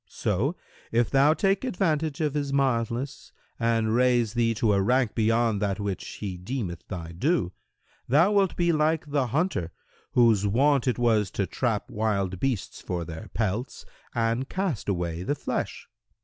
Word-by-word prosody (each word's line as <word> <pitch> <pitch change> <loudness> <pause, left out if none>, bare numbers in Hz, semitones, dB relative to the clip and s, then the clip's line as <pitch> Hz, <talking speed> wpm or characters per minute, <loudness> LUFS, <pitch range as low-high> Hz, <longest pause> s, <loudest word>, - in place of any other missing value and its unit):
So, 115 - -1 0.4
if 115 0 +2
thou 140 +3 +5
take 195 +4 +1
advantage 165 - 0
of 150 -3 0
his 145 -2 -2
mildness 130 -1 -1 0.3
and 115 -1 +1
raise 120 -2 +3
thee 115 -1 +1
to 105 -1 +2
a 100 - +3
rank 125 +2 +2
beyond 115 -1 +2
that 100 -1 -1
which 100 -2 -3
he 95 -4 -6
deemeth 90 -3 -5
thy 85 -4 -6
due, 125 - 0 0.6
thou 160 - +5
wilt 200 -3 +2
be 175 -1 +2
like 155 0 +1
the 140 -3 0
hunter, 130 - -1 0.4
whose 115 -4 +4
wont 135 +5 +3
it 125 - +1
was 110 -5 +2
to 100 - -1
trap 115 0 -2
wild 100 -4 -1
beasts 125 -5 -2
for 85 -2 -3
their 80 -1 -8
pelts 110 +3 -2 0.3
and 115 +3 0
cast 185 - -2
away 85 -3 -2
the 145 +11 -1
flesh. - - -4
115 Hz, 160 wpm, -26 LUFS, 100-140 Hz, 0.6 s, thou